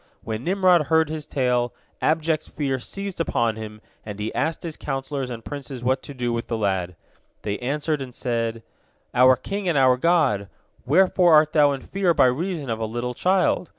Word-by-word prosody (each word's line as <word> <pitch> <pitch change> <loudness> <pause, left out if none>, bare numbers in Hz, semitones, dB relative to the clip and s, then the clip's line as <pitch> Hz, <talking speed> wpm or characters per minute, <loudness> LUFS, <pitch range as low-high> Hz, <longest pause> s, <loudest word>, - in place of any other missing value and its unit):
When 110 +1 -4
Nimrod 180 -4 +3
heard 160 -1 +3
his 155 -1 -5
tale, 125 -3 0 0.3
abject 155 0 0
fear 135 -3 -2
seized 195 +8 -6
upon 115 -8 0
him, 110 -1 -8 0.2
and 105 -1 -8
he 105 +1 -3
asked 160 +2 -1
his 165 -3 -5
counsellors 135 -1 -4
and 115 -2 -7
princes 135 -4 -7
what 130 +1 +1
to 140 - -10
do 120 -2 -1
with 115 0 -3
the 115 - -2
lad. 95 -4 -1 0.5
They 105 -1 -3
answered, 150 +3 -1
and 125 -2 -7
said: 115 -2 -2 0.5
"Our 130 +1 +6
king 195 +7 -4
and 165 - +1
our 130 -2 +5
god! 130 - +2 0.4
Wherefore 175 +2 +5
art 155 0 +4
thou 145 -2 +5
in 135 - -5
fear 185 0 0
by - - +5
reason 155 +4 -1
of 115 -1 -2
a 110 - -1
little 120 +2 -3
child? 180 +3 +1
135 Hz, 185 wpm, -23 LUFS, 120-160 Hz, 0.5 s, Our